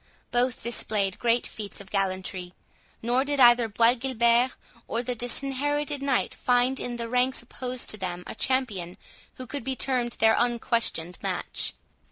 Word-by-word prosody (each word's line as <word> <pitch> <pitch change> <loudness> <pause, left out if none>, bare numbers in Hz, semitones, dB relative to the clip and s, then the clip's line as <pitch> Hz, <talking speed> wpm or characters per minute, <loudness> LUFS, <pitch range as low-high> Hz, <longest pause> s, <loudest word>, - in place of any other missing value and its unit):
Both 245 0 +1
displayed 210 -4 0
great 235 0 +2
feats 210 -2 -7
of 200 -1 -13
gallantry, 185 -2 -2 0.5
nor 245 +3 +2
did 285 0 -1
either 240 -2 +7
Bois 230 +3 +4
Guilbert 240 -1 +2 0.3
or 235 +1 -2
the 250 0 -1
Disinherited 275 +4 -1
Knight 275 -2 +1
find 250 +1 +2
in 245 - -4
the 235 -1 -4
ranks 250 +1 +1
opposed 250 +1 -5
to 215 - -3
them 180 -2 -4
a - - -6
champion 205 -10 0 0.4
who 255 - -7
could 280 +1 -5
be 265 +1 -2
termed 250 -3 +1
their 220 0 +4
unquestioned 230 -7 0
match. - - -2
240 Hz, 155 wpm, -27 LUFS, 220-255 Hz, 0.5 s, either